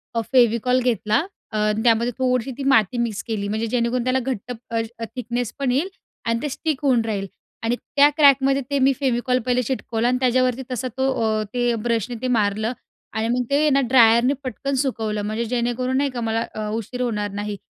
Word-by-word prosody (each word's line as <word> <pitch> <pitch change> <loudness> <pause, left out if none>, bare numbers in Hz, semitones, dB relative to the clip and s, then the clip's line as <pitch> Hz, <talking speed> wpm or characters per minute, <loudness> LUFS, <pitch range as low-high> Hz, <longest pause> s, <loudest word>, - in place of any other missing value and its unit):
अ, 230 - +2
फेविकॉल 245 +1 +4
घेतला, 215 -2 +1 0.3
अ, 215 -1 +1
त्यामध्ये 235 +1 +3
थोडीशी 255 0 0
ती 275 - -4
माती 225 0 +3
मिक्स 230 -4 -2
केली, 210 -3 -2
म्हणजे 220 +2 -2
जेणेकरून 240 +1 0
त्याला 255 +1 +1
घट्ट 250 -2 -4
अ, 230 -1 -3 0.2
अ, 230 - -1
थिकनेसपण 245 +2 -2
येईल 295 +9 0 0.4
आणि 230 0 0
ते 295 - -2
स्टिक 305 0 -2
होऊन 255 -4 +3
राहील 200 -3 -2 0.4
आणि 230 +2 +1
त्या 285 +3 +3
क्रॅकमध्ये 275 -1 +5
ते 280 -1 +1
मी 270 +1 +4
फेविकॉल 250 -1 +1
पहिले 250 0 +2
चिटकवलं 240 -1 -2
आणि 250 0 +2
त्याच्यावरती 255 0 +2
तसा 255 +1 -2
तो 265 0 +2
अ, 215 -1 +1
ते 245 -1 +1
ब्रशने 235 +1 -1
मारलं 220 -1 +1 0.4
आणि 220 0 0
मग 250 +1 +1
ते 295 +2 +3
ना 275 0 +3
ड्रायरने 235 +1 +5
पटकन 275 +2 -3
सुकवलं, 220 -5 -2
म्हणजे 215 +3 -2
जेणेकरून 250 +2 -1
नाही 280 0 +1
का 245 -2 -5
मला 225 0 0
अ, 215 -1 -3
उशीर 230 +3 -4
होणार 210 -4 -1
नाही 205 0 -4
240 Hz, 185 wpm, -22 LUFS, 225-255 Hz, 0.4 s, क्रॅकमध्ये